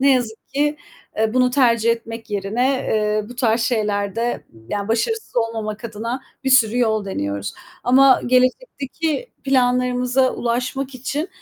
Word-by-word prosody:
ne 275 +1 +5
yazık 230 -3 -2
ki, 295 +1 0 0.4
eee, 220 +2 +1
bunu 250 0 +4
tercih 235 -3 +3
etmek 230 -1 -4
yerine, 205 +6 0
eee, 215 -5 0
bu 245 - -9
tarz 235 -2 +2
şeylerde, 215 0 -1 0.2
yani 205 0 -3
başarısız 440 - -1
olmamak 225 -1 -2
adına 230 +3 -4 0.2
bir 265 - +1
sürü 245 -2 +5
yol 220 -3 +1
deniyoruz 100 - -3 0.3
ama 265 +2 +6
gelecekteki 280 - 0
planlarımıza 250 0 +2
ulaşmak 255 +3 -2
için 280 +6 -3
245 Hz, 130 wpm, -21 LUFS, 220-260 Hz, 0.4 s, ama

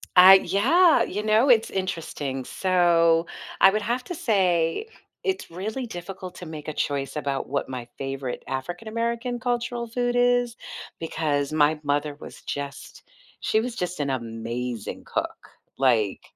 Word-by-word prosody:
I 185 +1 +11
yeah, 320 - +4
you 210 +3 -3
know, 220 +5 +4
it's 225 -3 +5
interesting, 150 -8 -3
so, 170 -3 +3 0.4
I 190 - +9
would 215 +2 0
have 245 +4 -1
to 355 - -5
say 185 - +1 0.4
it's 380 - -2
really 215 +9 -4
difficult 185 -1 -8
to 180 - -9
make 155 -2 -8
a 155 - -3
choice 140 0 -2
about 140 -2 -2
what 140 +1 -1
my 125 -2 -6
favorite 135 -2 -4
African 175 +10 -5
American 235 +2 -2
cultural 240 -1 -2
food 245 +1 -1
is 245 -1 +3 0.4
because 150 -3 -1
my 155 0 +3
mother 145 0 0
was - - -11
just 140 0 -6 0.4
she 220 - +2
was 240 +1 -3
just 180 -6 -3
an 140 -1 -1
amazing 115 -1 -4
cook, - - -4 0.3
like, 115 -7 +2
175 Hz, 145 wpm, -25 LUFS, 145-230 Hz, 0.4 s, I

